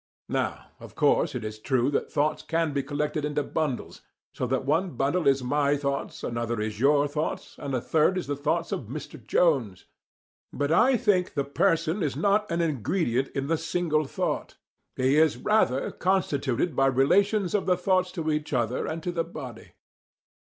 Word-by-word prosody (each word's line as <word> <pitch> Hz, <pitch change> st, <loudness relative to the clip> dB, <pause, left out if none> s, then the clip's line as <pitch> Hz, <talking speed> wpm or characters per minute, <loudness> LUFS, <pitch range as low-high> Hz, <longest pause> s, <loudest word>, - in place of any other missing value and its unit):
Now, -, -, -2 dB
of -, -, -12 dB
course -, -, +2 dB
it -, -, -4 dB
is 110 Hz, 0 st, -6 dB
true 130 Hz, +3 st, +1 dB
that -, -, -1 dB
thoughts 150 Hz, +2 st, 0 dB
can 165 Hz, -2 st, -1 dB
be 140 Hz, -, 0 dB
collected 150 Hz, +2 st, -2 dB
into 150 Hz, 0 st, -1 dB
bundles, 145 Hz, -3 st, -3 dB, 0.3 s
so 125 Hz, -, -2 dB
that 130 Hz, +1 st, -1 dB
one 160 Hz, +2 st, 0 dB
bundle 140 Hz, +7 st, +1 dB
is 135 Hz, -1 st, +3 dB
my 145 Hz, +2 st, +1 dB
thoughts, 140 Hz, -1 st, -3 dB
another 115 Hz, -1 st, -2 dB
is 105 Hz, 0 st, -3 dB
your 145 Hz, +2 st, +4 dB
thoughts, 150 Hz, +2 st, -3 dB
and 140 Hz, -2 st, -3 dB
a 125 Hz, -, -1 dB
third 160 Hz, +7 st, +2 dB
is 185 Hz, -, -2 dB
the 145 Hz, -, -2 dB
thoughts 155 Hz, +4 st, -1 dB
of 130 Hz, -, -3 dB
Mr. 135 Hz, -1 st, -8 dB
Jones. 115 Hz, -, +1 dB, 0.7 s
But 145 Hz, +1 st, -1 dB
I 250 Hz, +9 st, +5 dB
think 205 Hz, -6 st, +1 dB
the 140 Hz, -, +1 dB
person 165 Hz, +4 st, +1 dB
is 145 Hz, -6 st, -1 dB
not 200 Hz, +6 st, +1 dB
an 170 Hz, 0 st, +1 dB
ingredient 140 Hz, -, 0 dB
in 135 Hz, -1 st, -1 dB
the 160 Hz, +2 st, 0 dB
single 155 Hz, -4 st, 0 dB
thought: -, -, -3 dB, 0.4 s
he 130 Hz, +3 st, +2 dB
is 155 Hz, -5 st, +4 dB
rather 135 Hz, -, +1 dB
constituted 155 Hz, -6 st, 0 dB
by 135 Hz, +1 st, +3 dB
relations 185 Hz, -, +2 dB
of 205 Hz, -2 st, 0 dB
the 180 Hz, -1 st, +3 dB
thoughts 185 Hz, 0 st, +1 dB
to 160 Hz, -3 st, -2 dB
each 150 Hz, -1 st, -2 dB
other 120 Hz, -1 st, 0 dB
and 160 Hz, 0 st, -4 dB
to 175 Hz, -, -2 dB
the 170 Hz, -1 st, -1 dB
body. 130 Hz, -9 st, -9 dB
150 Hz, 180 wpm, -26 LUFS, 135-170 Hz, 0.7 s, I